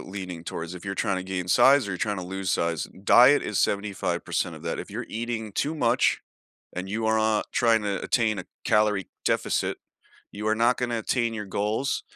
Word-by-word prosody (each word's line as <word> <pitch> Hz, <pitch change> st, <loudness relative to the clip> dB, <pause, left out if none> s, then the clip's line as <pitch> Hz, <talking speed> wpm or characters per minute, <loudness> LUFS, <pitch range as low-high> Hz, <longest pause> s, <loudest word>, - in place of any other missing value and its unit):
leaning 90 Hz, -3 st, -7 dB
towards, 85 Hz, +2 st, -5 dB
if 90 Hz, -, -10 dB
you're 95 Hz, 0 st, -3 dB
trying 95 Hz, -, 0 dB
to 95 Hz, -, -4 dB
gain 90 Hz, -2 st, -4 dB
size 135 Hz, +5 st, +5 dB
or 95 Hz, -, -3 dB
tryna 100 Hz, -2 st, -2 dB
lose 95 Hz, 0 st, -3 dB
size, 85 Hz, -2 st, 0 dB, 0.2 s
diet 125 Hz, +7 st, +6 dB
is 105 Hz, -, -2 dB
75% 100 Hz, -1 st, -1 dB
of -, -, -12 dB
that, -, -, -3 dB
if -, -, -6 dB
you're -, -, -5 dB
eating 115 Hz, -1 st, -4 dB
too 150 Hz, +10 st, -1 dB
much 120 Hz, -4 st, +2 dB, 0.6 s
and 90 Hz, +1 st, -4 dB
you 110 Hz, +3 st, -2 dB
are 110 Hz, -, +3 dB
not 110 Hz, -1 st, +1 dB
tryna 110 Hz, -5 st, +2 dB
attain 110 Hz, -4 st, +1 dB
a 95 Hz, -, -5 dB, 0.2 s
calorie 105 Hz, -2 st, +2 dB, 0.2 s
deficit, -, -, 0 dB, 0.5 s
you 105 Hz, +1 st, -5 dB
are 110 Hz, -, +3 dB
not 120 Hz, +2 st, +3 dB
gonna 120 Hz, -2 st, -1 dB
attain 115 Hz, +1 st, 0 dB
your 105 Hz, -1 st, -4 dB
goals. 105 Hz, +7 st, -1 dB
105 Hz, 190 wpm, -26 LUFS, 95-115 Hz, 0.6 s, diet